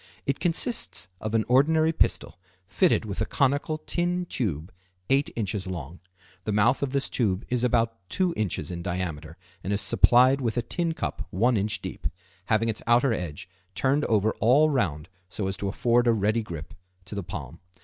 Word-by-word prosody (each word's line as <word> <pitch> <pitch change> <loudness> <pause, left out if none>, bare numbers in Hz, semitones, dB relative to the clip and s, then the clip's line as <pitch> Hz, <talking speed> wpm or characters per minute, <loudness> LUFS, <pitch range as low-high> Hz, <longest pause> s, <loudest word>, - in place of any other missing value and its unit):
It 140 - -1
consists 165 - 0
of 110 +1 -3
an 110 - +3
ordinary 155 +5 +4
pistol 90 - 0 0.3
fitted 175 - +2
with 100 0 -4
a - - +2
conical 145 +3 +1
tin 175 +3 -1
tube 90 - -3 0.4
8 140 +1 +3
in. 100 -3 -3
long. 85 -1 -7 0.4
The 110 - -2
mouth 105 +5 +3
of 140 - 0
this 140 0 0
tube 100 -5 -1
is 125 -1 +1
about 115 -2 +1
2 185 -2 +1
in. 105 -3 0
in 85 -2 -5
diameter 85 -3 -4 0.3
and 95 - -3
is 100 - +1
supplied 125 +5 +4
with 115 -1 -1
a 120 - +1
tin 165 +6 -1
cup 85 - -4
1 115 +8 +2
in. 105 0 +1
deep, 110 - -4 0.4
having 110 +2 +2
its 110 -1 -2
outer 120 +1 +4
edge 90 -3 -5 0.3
turned 140 +2 +1
over 110 0 +2
all 140 +7 +4
round 85 - -1 0.2
so 100 - -4
as 95 - -2
to 100 - -3
afford 120 +4 +2
a 120 - +5
ready 110 +2 +1
grip 85 -8 -8 0.3
to - - -9
the 100 - -3
palm. 85 - -7
115 Hz, 180 wpm, -26 LUFS, 95-135 Hz, 0.4 s, a